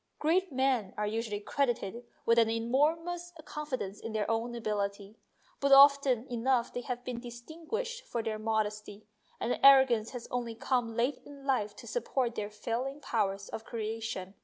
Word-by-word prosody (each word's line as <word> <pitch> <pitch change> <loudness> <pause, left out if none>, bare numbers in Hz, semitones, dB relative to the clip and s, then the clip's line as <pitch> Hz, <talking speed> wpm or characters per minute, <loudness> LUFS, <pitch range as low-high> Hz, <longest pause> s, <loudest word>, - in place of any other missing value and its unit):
Great 355 +3 +1
men 260 -7 +1
are 210 - 0
usually 215 -1 -2
credited 235 -2 -1 0.2
with 230 0 +5
an 225 -1 +4
enormous 320 +10 0
confidence 255 -10 -4
in 225 - -6
their 215 -1 0
own 230 +2 -1
ability, 205 -2 -3 0.4
but 280 0 +1
often 275 -3 +7
enough 240 0 +1
they 245 - -3
have 245 0 -4
been 250 -2 -4
distinguished 325 - -5
for 235 -2 -2
their 215 -1 -3
modesty, 215 -1 -2 0.3
and 235 - -1
the - - -2
arrogance 265 -5 +7
has 245 -2 -7
only 240 -2 -2
come 240 -2 -1
late 245 +5 +1
in 280 -1 -12
life 210 -7 0
to - - -11
support 265 - -1
their 205 -3 -3
failing 245 +6 -3
powers 200 -7 -1
of 220 - -6
creation. 220 -4 -4
235 Hz, 160 wpm, -31 LUFS, 215-275 Hz, 0.4 s, often